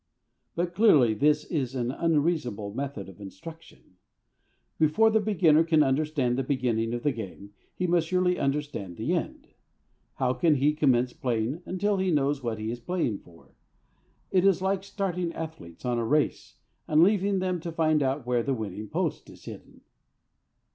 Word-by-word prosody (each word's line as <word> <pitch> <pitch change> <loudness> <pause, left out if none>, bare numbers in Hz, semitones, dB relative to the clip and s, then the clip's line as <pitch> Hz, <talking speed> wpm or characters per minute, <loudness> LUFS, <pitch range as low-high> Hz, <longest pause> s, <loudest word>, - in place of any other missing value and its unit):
But 175 +1 -1
clearly 150 - +5
this 150 +7 +2
is 135 -7 -3
an 125 -1 -1
unreasonable 145 -10 0
method 130 -5 -5
of 95 +2 -13
instruction. 100 - -12 0.8
Before 160 +9 +4
the 220 - +3
beginner 175 -7 +4
can 160 -2 +3
understand 135 -2 0
the - - 0
beginning 125 -4 0
of 120 - -5
the 145 - +2
game 100 -3 -8 0.2
he 180 - -2
must 170 -2 +2
surely 180 0 +1
understand 140 - -3
the - - -1
end; - - -4 0.7
how 130 -1 +1
can 160 +1 +3
he 145 +2 +2
commence 130 -5 +2
playing 125 0 -2
until 200 +2 0
he 190 0 0
knows 145 -3 +1
what 115 -3 -3
he 110 +1 -3
is 120 - -5
playing 125 - -2
for? 85 -1 -20 0.8
It 185 -1 +3
is 195 -3 +4
like 190 0 -1
starting 185 -4 -3
athletes 155 - -8
on 120 -1 0
a - - -1
race, 150 +6 0 0.3
and 155 +1 +5
leaving 200 0 +2
them 185 -1 -1
to 170 +1 -6
find 155 -2 +2
out 135 -1 -1
where 125 -1 +1
the 135 +3 -1
winning 105 -2 -6
post - - -2
is - - -15
hidden. - - -11
150 Hz, 170 wpm, -27 LUFS, 120-170 Hz, 0.8 s, clearly